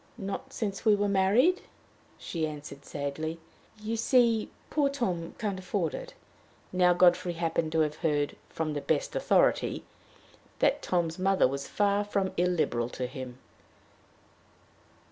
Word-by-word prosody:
"Not 220 Hz, +5 st, -5 dB
since 205 Hz, -6 st, -3 dB
we 215 Hz, -2 st, +5 dB
were 205 Hz, 0 st, +1 dB
married," 205 Hz, -, +3 dB, 0.6 s
she 160 Hz, -2 st, -3 dB
answered, 145 Hz, -2 st, -9 dB
sadly. 155 Hz, +3 st, -4 dB, 0.4 s
"You 215 Hz, +2 st, -3 dB
see, 230 Hz, -1 st, +3 dB, 0.2 s
poor 290 Hz, -2 st, +2 dB
Tom 185 Hz, -12 st, -2 dB
can't 205 Hz, -4 st, -2 dB
afford 185 Hz, -, -1 dB
it." -, -, -7 dB, 0.6 s
Now 180 Hz, -1 st, +5 dB
Godfrey 175 Hz, 0 st, +4 dB
happened 165 Hz, -1 st, -1 dB
to 160 Hz, -, +3 dB
have 150 Hz, 0 st, 0 dB
heard, 145 Hz, -3 st, 0 dB
"from 155 Hz, -2 st, -2 dB
the 145 Hz, -, -3 dB
best -, -, -1 dB
authority," -, -, +2 dB, 0.7 s
that -, -, +2 dB
Tom's 170 Hz, -1 st, -1 dB
mother 190 Hz, -3 st, +4 dB
was 140 Hz, +1 st, -4 dB
far 205 Hz, 0 st, +1 dB
from 200 Hz, -2 st, -1 dB
illiberal 165 Hz, -10 st, +1 dB
to 125 Hz, -, -4 dB
him. 125 Hz, -1 st, -7 dB
180 Hz, 135 wpm, -29 LUFS, 155-205 Hz, 0.7 s, we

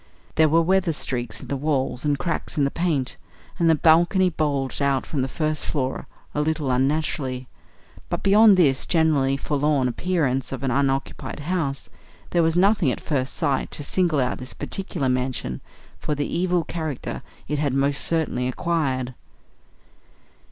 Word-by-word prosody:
There 160 Hz, 0 st, +4 dB
were 165 Hz, +2 st, +4 dB
weather 185 Hz, -1 st, +2 dB
streaks 125 Hz, -4 st, -4 dB
in -, -, -9 dB
the 140 Hz, -, -2 dB
wall 135 Hz, -3 st, -1 dB
and 145 Hz, -1 st, +1 dB
cracks 170 Hz, +1 st, -3 dB
in 145 Hz, -, +3 dB
the 140 Hz, -, +1 dB
paint, 160 Hz, -7 st, -1 dB, 0.4 s
and 170 Hz, -1 st, +4 dB
the 160 Hz, -, +6 dB
balcony 175 Hz, +4 st, +4 dB
bulged 145 Hz, -4 st, -1 dB
out 140 Hz, -1 st, +1 dB
from 145 Hz, -, -2 dB
the 130 Hz, -, 0 dB
first 155 Hz, +2 st, -2 dB
floor 135 Hz, -3 st, -2 dB, 0.3 s
a 150 Hz, -, 0 dB
little 150 Hz, -3 st, 0 dB
unnaturally. 130 Hz, -1 st, 0 dB, 0.6 s
But, -, -, -3 dB
beyond 205 Hz, 0 st, +6 dB
this 140 Hz, -7 st, +3 dB
generally 150 Hz, -6 st, +2 dB
forlorn 145 Hz, -2 st, +1 dB
appearance 135 Hz, -2 st, -1 dB
of 135 Hz, -1 st, -5 dB
an 135 Hz, -, 0 dB
unoccupied 135 Hz, +2 st, -1 dB
house, 150 Hz, -4 st, -2 dB, 0.4 s
there 175 Hz, -, +3 dB
was 165 Hz, +1 st, +2 dB
nothing 195 Hz, -4 st, +4 dB
at -, -, -4 dB
first 135 Hz, -3 st, -2 dB
sight 135 Hz, -2 st, 0 dB
to 145 Hz, -, -4 dB
single 165 Hz, 0 st, +1 dB
out 125 Hz, -1 st, 0 dB
this 130 Hz, 0 st, -7 dB
particular 180 Hz, -8 st, -3 dB
mansion 125 Hz, -, -2 dB, 0.4 s
for 150 Hz, -, -2 dB
the 145 Hz, 0 st, -1 dB
evil 175 Hz, 0 st, 0 dB
character 160 Hz, -4 st, -4 dB, 0.3 s
it 150 Hz, -1 st, -1 dB
had 145 Hz, -2 st, +1 dB
most 140 Hz, +1 st, +1 dB
certainly 155 Hz, -7 st, 0 dB
acquired. 130 Hz, -3 st, -1 dB
145 Hz, 160 wpm, -23 LUFS, 135-165 Hz, 0.6 s, the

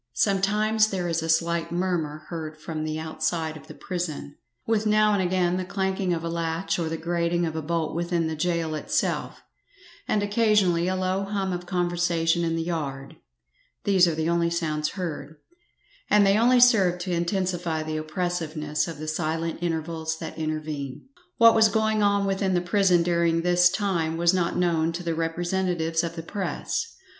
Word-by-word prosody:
Sometimes 210 Hz, +2 st, +2 dB
there 185 Hz, -4 st, -2 dB
is 165 Hz, -1 st, 0 dB
a 165 Hz, -, -4 dB
slight 170 Hz, +1 st, +1 dB
murmur 170 Hz, -4 st, -2 dB
heard 155 Hz, -2 st, -6 dB
from 155 Hz, 0 st, -5 dB
the 155 Hz, 0 st, -3 dB
outside 160 Hz, 0 st, -2 dB
of 155 Hz, -, -12 dB
the -, -, -10 dB
prison, 175 Hz, -6 st, -5 dB, 0.3 s
with 220 Hz, -1 st, +1 dB
now 215 Hz, 0 st, +4 dB
and 200 Hz, -, +2 dB
again 180 Hz, -1 st, +1 dB
the 185 Hz, -, -2 dB
clanking 190 Hz, 0 st, -1 dB
of 165 Hz, -1 st, -1 dB
a -, -, -2 dB
latch 165 Hz, +2 st, -2 dB
or 165 Hz, -2 st, -1 dB
the 165 Hz, -, -3 dB
grating 170 Hz, +1 st, 0 dB
of 160 Hz, -1 st, -4 dB
a 160 Hz, -, -2 dB
bolt 160 Hz, 0 st, -2 dB
within 170 Hz, 0 st, 0 dB
the 160 Hz, 0 st, -2 dB
gaol 165 Hz, -1 st, -1 dB
itself, 155 Hz, -, -2 dB, 0.6 s
and 205 Hz, -, +1 dB
occasionally 205 Hz, -5 st, +2 dB
a 185 Hz, -, 0 dB
low 185 Hz, +1 st, -1 dB
hum 195 Hz, -2 st, -2 dB
of 180 Hz, 0 st, -5 dB
conversation 175 Hz, -2 st, +1 dB
in 165 Hz, -1 st, 0 dB
the 165 Hz, -, -1 dB
yard 140 Hz, -5 st, -4 dB, 0.7 s
these 190 Hz, -3 st, +4 dB
are 165 Hz, -, 0 dB
the 160 Hz, 0 st, -1 dB
only 170 Hz, 0 st, +2 dB
sounds 155 Hz, -3 st, -1 dB
heard, 160 Hz, -5 st, -5 dB, 0.7 s
and 210 Hz, -1 st, +5 dB
they 195 Hz, 0 st, +4 dB
only 245 Hz, +3 st, +4 dB
serve 210 Hz, -8 st, +5 dB
to 180 Hz, +1 st, -4 dB
intensify 175 Hz, -2 st, -1 dB
the 155 Hz, 0 st, -3 dB
oppressiveness 155 Hz, -2 st, -2 dB
of 165 Hz, -3 st, -6 dB
the 155 Hz, +1 st, -7 dB
silent 165 Hz, +1 st, -2 dB
intervals 160 Hz, -1 st, -2 dB
that -, -, -7 dB
intervene. 155 Hz, -, -4 dB, 0.3 s
What 230 Hz, -1 st, +7 dB
was 220 Hz, 0 st, +6 dB
going 220 Hz, 0 st, +1 dB
on 200 Hz, -1 st, +2 dB
within 195 Hz, -1 st, 0 dB
the -, -, +3 dB
prison 180 Hz, -1 st, +3 dB
during 170 Hz, -1 st, +1 dB
this 175 Hz, 0 st, +5 dB
time 175 Hz, -5 st, -1 dB
was 170 Hz, +1 st, +3 dB
not 175 Hz, -2 st, 0 dB
known 165 Hz, -2 st, +1 dB
to 175 Hz, +2 st, -5 dB
the 170 Hz, -1 st, -1 dB
representatives 165 Hz, 0 st, -1 dB
of 170 Hz, 0 st, -4 dB
the 165 Hz, -, -6 dB
press. 200 Hz, -, -3 dB
170 Hz, 180 wpm, -25 LUFS, 160-190 Hz, 0.7 s, What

